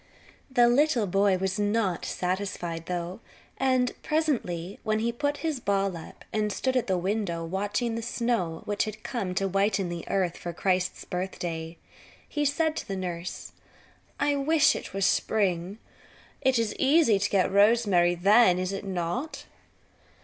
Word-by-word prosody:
The 245 -2 +5
little 250 -2 +3
boy 195 0 +2
was 190 +2 -2
not 205 -3 0
satisfied, 180 -3 -3
though, 175 +1 -4 0.4
and 255 -2 +2
presently 220 - -1
when 215 -1 0
he 220 - -1
had 235 - -7
put 290 0 0
his 310 -5 -1
ball 195 -4 0
up 165 - -11
and 210 -1 0
stood 260 +6 -1
at 250 - +1
the 190 -2 +1
window 180 -3 -2
watching 205 +6 -1
the 230 - -3
snow 230 -8 -1
which 205 +1 0
had 215 0 -7
come 195 -8 -3
to 195 +1 +1
whiten 195 -1 +1
the 170 -1 -5
earth 185 -3 0
for 175 - -6
Christ's 185 +1 -1
birthday, 170 -3 -4 0.5
he 295 0 -1
said 310 +2 +1
to - - -5
the 195 - -3
nurse: 180 -1 -5 0.7
"I 290 0 +2
wish 305 +2 +4
it - - -6
were 195 - -4
spring. 190 -1 +1 0.6
It 260 -1 +3
is 230 -2 0
easy 275 -7 +4
to 205 +1 0
get 190 -2 +2
rosemary 200 -4 +4
then, 195 +1 +5
is 185 +1 -2
it 195 - -4
not?" 190 - -3
200 Hz, 160 wpm, -27 LUFS, 180-240 Hz, 0.7 s, The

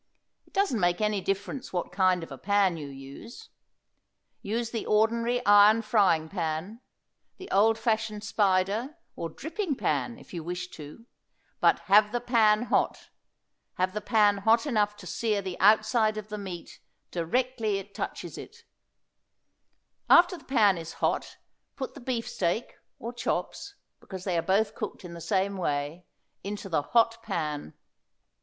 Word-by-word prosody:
It - - -26
doesn't 390 - +1
make 175 -1 +2
any 210 -2 0
difference 195 +8 -3
what 175 -2 -3
kind 185 -1 +2
of 165 - -10
a 135 - -7
pan 200 -3 +2
you 150 -3 -6
use. 140 - -11 0.9
Use 230 +3 -2
the 230 - -3
ordinary 230 +3 +2
iron 205 +2 +6
frying 195 -8 +3
pan, 170 +5 -4 0.6
the 380 - -9
old 220 +2 +4
fashioned 220 -2 -1
spider, 205 - +1 0.2
or 165 - -4
dripping 320 - -3
pan, 240 -1 -1
if - - -16
you 170 -2 -5
wish 180 +2 -5
to; 155 +9 -11 0.5
but - - +3
have 210 +1 +5
the 240 - 0
pan 230 -2 +3
hot; - - -1 0.6
have 185 0 0
the 210 - -3
pan 210 -1 +3
hot 225 +5 +3
enough 210 -6 +1
to 205 -3 -12
sear 215 +2 -1
the 190 -2 -5
outside 215 +2 +4
of 215 0 -6
the 210 - -5
meat 185 -4 -8 0.3
directly 220 +4 0
it 195 +1 -8
touches - - -5
it; - - -12 1.5
after 350 +1 +7
the 330 - -14
pan 210 -9 +3
is 165 0 -7
hot - - -2 0.4
put 265 - -5
the - - -11
beefsteak, 230 -5 -2 0.2
or 235 +2 -6
chops 400 +10 -3 0.2
because 190 -2 -9
they 185 -3 -1
are 165 - +2
both 195 +5 +1
cooked - - -6
in 170 - -8
the 170 - -9
same 195 +1 0
way 150 0 -3 0.4
into 200 0 -5
the 160 - +1
hot 230 +7 +2
pan. 150 - -4
205 Hz, 155 wpm, -28 LUFS, 180-230 Hz, 1.5 s, after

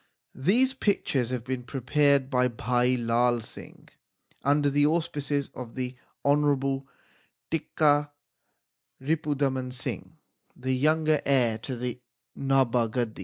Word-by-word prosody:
These 235 - +2
pictures 145 - 0
have 125 -3 -3
been 130 0 -3
prepared 140 +2 +1
by 125 -1 +3
Bhai 125 +1 +1
Lai 120 +1 +2
Singh 110 - -11 0.5
under 145 +1 +2
the 145 +1 +2
auspices 150 -3 0
of 120 -3 -8
the 130 -1 -4 0.3
Honourable 140 -2 +2 0.6
Tikka 150 -2 +2 0.9
Ripu 150 +1 -1
daman 130 -2 -1
Singh, 125 - -5 0.4
the 130 +1 -2
young 155 +4 +2
heir 135 -7 +2
to 130 +3 -5
the 125 0 -4 0.3
Nabha 130 -4 +2
gadi. 115 -1 -3
135 Hz, 120 wpm, -27 LUFS, 125-145 Hz, 0.9 s, by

